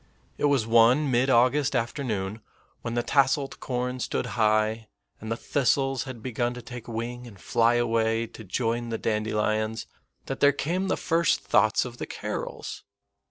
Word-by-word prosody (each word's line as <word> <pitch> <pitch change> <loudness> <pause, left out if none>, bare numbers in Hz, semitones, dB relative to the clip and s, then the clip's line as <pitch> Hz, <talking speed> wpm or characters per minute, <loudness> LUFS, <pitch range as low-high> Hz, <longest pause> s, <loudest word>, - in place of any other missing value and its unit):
It - - +1
was 140 -6 +3
one 120 +5 +4
mid 125 +2 +2
August 135 +4 +3
afternoon, 115 -5 -2 0.4
when 115 0 -4
the 120 - +1
tasseled 135 +1 +1
corn 125 0 -3
stood - - -2
high, 110 0 +1 0.3
and 110 +1 -7
the 115 - -1
thistles 135 0 +1
had 125 -5 -8
begun 120 -1 -1
to 125 - -7
take 120 -1 -9
wing 120 +2 -5
and 100 -5 -13
fly 115 +4 +2
away 115 -1 +1
to 110 - -11
join 115 +3 -2
the 115 - -2
dandelions, 110 0 -1 0.4
that 135 - -4
there 145 0 +5
came 175 +7 -1
the 190 - 0
first 165 +1 +1
thoughts - - +3
of - - -8
the - - -4
carols. - - -5
120 Hz, 160 wpm, -26 LUFS, 110-135 Hz, 0.4 s, there